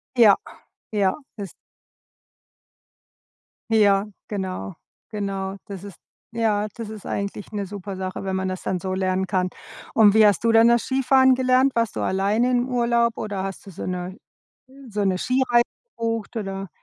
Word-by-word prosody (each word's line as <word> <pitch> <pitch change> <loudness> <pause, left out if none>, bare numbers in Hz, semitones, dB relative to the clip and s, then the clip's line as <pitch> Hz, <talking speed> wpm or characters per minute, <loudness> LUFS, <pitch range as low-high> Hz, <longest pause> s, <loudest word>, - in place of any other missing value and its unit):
Ja, 220 -5 +7 0.6
ja, 195 -3 +2 0.2
ist 200 -3 -6 2.2
Ja, 205 -2 +4 0.2
genau. 190 -2 -4 0.3
Genau. 195 -2 -3
Das 195 -2 -8
ist 200 -4 -10 0.3
ja, 215 -2 +1
das 230 -3 -6
ist 215 -2 -9
eigentlich 200 0 -4
'ne 205 -2 -3
super 200 0 -7
Sache, 185 0 -4
wenn 190 -1 -2
man 190 0 -1
das 185 - -4
dann 185 - -1
so 185 +1 -3
lernen 190 0 0
kann. 185 0 0 0.4
Und, 210 -3 +6
wie 220 0 +6
hast 205 0 +3
du 230 - +4
denn 225 +1 +6
das 235 -1 +4
Skifahren 265 0 +4
gelernt? 255 +1 +3
Warst 230 -2 0
du - - -2
alleine 205 +6 +1
im 245 0 +1
Urlaub 235 -1 +2
oder 200 -3 -3
hast 195 0 -6
du 195 - -10
so - - -7
'ne, 180 +1 -4 0.5
äh - - -21 0.2
so 205 0 -1
'ne 190 -1 +2
Skireise 250 -1 +3 0.3
gebucht, 230 0 -3
oder? 195 -2 -4
205 Hz, 165 wpm, -23 LUFS, 190-230 Hz, 2.2 s, Ja